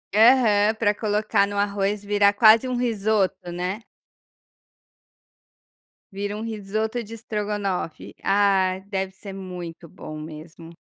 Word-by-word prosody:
Aham, 220 Hz, -2 st, +5 dB
para 215 Hz, -2 st, +2 dB
colocar 210 Hz, -1 st, +1 dB
no 205 Hz, 0 st, -5 dB
arroz 200 Hz, 0 st, 0 dB
vira 205 Hz, 0 st, +4 dB
quase 220 Hz, +3 st, +6 dB
um 255 Hz, -, -2 dB
risoto, 210 Hz, -6 st, 0 dB
né. 180 Hz, +5 st, -4 dB, 2.3 s
Vira 205 Hz, +1 st, -4 dB
um -, -, -6 dB
risoto 220 Hz, +2 st, -3 dB
de 220 Hz, +1 st, -11 dB
estrogonofe, 205 Hz, -6 st, -4 dB
ah, 195 Hz, -2 st, +2 dB
deve 190 Hz, -1 st, -2 dB
ser 195 Hz, +1 st, -10 dB
muito 180 Hz, -3 st, -8 dB
bom 155 Hz, -3 st, -9 dB
mesmo. 160 Hz, +2 st, -10 dB
205 Hz, 115 wpm, -24 LUFS, 190-215 Hz, 2.3 s, quase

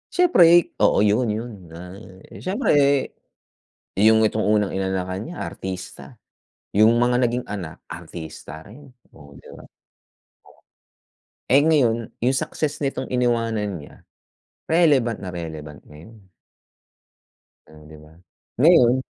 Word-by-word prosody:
Siyempre, 175 Hz, -, +4 dB
oo, 105 Hz, -, +4 dB
'yun 105 Hz, +4 st, +2 dB
'yun, 115 Hz, +3 st, -5 dB, 0.2 s
ay 95 Hz, +3 st, -12 dB
siyempre, 200 Hz, +9 st, 0 dB, 1.3 s
'yung 110 Hz, +2 st, +5 dB
itong 110 Hz, 0 st, 0 dB
unang 105 Hz, -1 st, +2 dB
inanakan 95 Hz, 0 st, -3 dB
niya 175 Hz, +2 st, -7 dB
artista, 95 Hz, -1 st, -8 dB, 0.6 s
'yung 110 Hz, +3 st, +5 dB
mga 120 Hz, +1 st, +2 dB
naging 120 Hz, +1 st, -2 dB
anak 95 Hz, -6 st, -7 dB
artista 80 Hz, -2 st, -9 dB
rin. 135 Hz, +8 st, -14 dB, 0.3 s
Oo, 70 Hz, -1 st, -16 dB
'di -, -, -15 dB
ba? -, -, -14 dB, 1.8 s
Eh, 135 Hz, +3 st, +5 dB
ngayon, 120 Hz, -8 st, +1 dB
'yung 130 Hz, +3 st, +1 dB
success 150 Hz, +2 st, -3 dB
nitong 135 Hz, -1 st, -3 dB
iniwanan 115 Hz, -7 st, -1 dB
niya, 75 Hz, -, -14 dB, 0.7 s
relevant 145 Hz, -9 st, +2 dB
na 95 Hz, -, -6 dB
relevant 80 Hz, -4 st, -8 dB
ngayon. 80 Hz, +10 st, -15 dB, 1.5 s
Hmm, 75 Hz, -1 st, -17 dB
'di 80 Hz, 0 st, -13 dB
ba, 75 Hz, 0 st, -18 dB, 0.5 s
ngayon 130 Hz, -5 st, +5 dB
110 Hz, 115 wpm, -22 LUFS, 90-125 Hz, 1.8 s, yung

